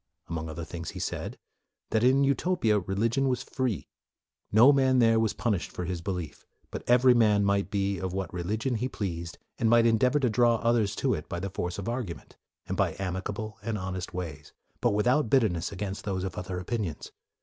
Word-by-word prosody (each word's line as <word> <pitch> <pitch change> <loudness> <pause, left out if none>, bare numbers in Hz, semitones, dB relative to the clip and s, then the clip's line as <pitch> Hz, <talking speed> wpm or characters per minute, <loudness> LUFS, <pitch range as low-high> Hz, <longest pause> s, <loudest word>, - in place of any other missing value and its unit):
Among 80 -1 -3
other 80 +1 -5
things, 85 +1 -6
he - - -7
said - - -4 0.5
that, 110 0 +2
in 130 +2 +5
Utopia, 140 - +2
religion 115 +8 0
was 125 - -1
free. 130 -6 -2 0.6
No 120 +7 +7
man 130 -1 +3
there 115 -2 +5
was 110 -2 +1
punished 105 -7 -1
for 90 - -4
his 90 -1 -3
belief, 90 -3 -5 0.3
but - - -5
every 125 +1 +6
man 105 -4 +4
might 100 0 +1
be 100 -2 -1
of 95 0 -3
what 95 -2 -4
religion 110 +8 -1
he 125 +4 -2
pleased, 85 -7 -4 0.2
and 115 - +2
might 115 0 +5
endeavor 125 +5 +3
to 130 - +2
draw 120 +1 +4
others 115 -3 +1
to - - +1
it - - -5
by 85 - -3
the 95 +1 -4
force 90 -1 -3
of 100 - -5
argument, 120 -8 -5 0.3
and - - -3
by - - +1
amicable 100 +3 -4
and 110 0 -2
honest 95 -1 -4
ways, 80 -5 -6 0.3
but - - +2
without 120 +4 +2
bitterness 105 -10 +2
against 100 0 -5
those 95 -3 -2
of 95 -2 -4
other 90 0 -4
opinions. 95 -4 -4
105 Hz, 195 wpm, -28 LUFS, 90-120 Hz, 0.6 s, No